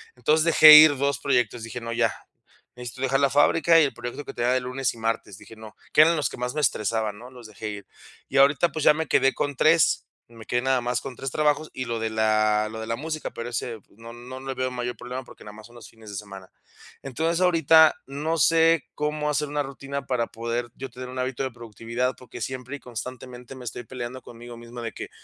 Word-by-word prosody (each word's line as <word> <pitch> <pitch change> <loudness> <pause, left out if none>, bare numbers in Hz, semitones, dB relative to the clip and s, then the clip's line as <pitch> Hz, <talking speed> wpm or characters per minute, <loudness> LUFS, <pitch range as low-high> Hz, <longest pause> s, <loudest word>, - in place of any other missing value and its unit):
entonces, 155 +1 +2
dejé 155 -2 +9
ir 150 -2 +9
2 140 0 0
proyectos. 125 -4 0
Dije: 115 +2 -6
"No, 115 0 -5
ya. 115 -1 +1 0.6
Necesito 125 +1 -9
dejar 135 0 +1
la 140 -1 +3
fábrica 165 +4 +4
y - - +5
el 135 -4 0
proyecto 120 +5 -7
que - - -8
tenía 120 +1 0
de 130 - +1
lunes 125 +1 -2
y - - -15
martes". 115 -3 -3
Dije: 115 - -14
"No". 110 -1 -12 0.2
Que - - +7
eran 165 +2 +5
los 150 - -1
que - - -10
más 125 +2 -3
me 150 - -1
estresaban 110 -4 -1
¿no?, 125 +2 -11
los 125 -3 -12
dejé 110 0 -8
ir. 105 -1 -8 0.4
Y 135 - -2
ahorita, 140 +4 +4
pues, 155 0 -3
ya 150 - +7
me 160 -1 -3
quedé 135 +1 +3
con 145 -1 -3
3, 155 +2 +3 0.2
me 115 -2 -14
quedé 120 - 0
nada 130 0 +1
más 120 0 -2
con 135 -3 -8
3 135 - -4
trabajos 150 0 0
y 130 - -4
lo 115 -1 -3
de 110 0 -2
la 110 -1 +1
lo 110 - -7
de 110 - -6
la 115 - -1
música, 155 +3 -5
pero 115 +1 -6
ese 115 -1 -4 0.2
no 115 +1 -11
no 125 +2 -10
le 135 0 -5
veo 130 0 -2
mayor 125 0 -4
problema, 125 +2 -6
porque - - -15
nada 105 - -10
más 110 +1 -13
son 120 - -19
los 120 - -12
fines 110 -2 -15
de 100 - -8
semana. 95 -2 -9 0.5
Entonces, 160 +6 -1
ahorita 160 -3 +5
no 150 +4 -2
sé 165 0 +4
cómo 150 0 -2
hacer 150 0 -1
una 145 0 -1
rutina 140 +1 -6
para 120 -3 0
poder 115 +1 -4
yo 135 0 -7
tener 125 +1 -9
un 130 - -6
hábito 130 +1 -2
de 130 - -3
productividad, 115 +2 -4
porque 125 -2 -11
siempre 130 +1 -5
y - - -21
constantemente, 125 +1 -9
me 125 -1 -11
estoy 120 +2 -6
peleando 125 +1 -7
conmigo 120 0 -11
mismo 120 +1 -11
de 115 -1 -5
que: - - -8
125 Hz, 240 wpm, -25 LUFS, 115-140 Hz, 0.6 s, dejé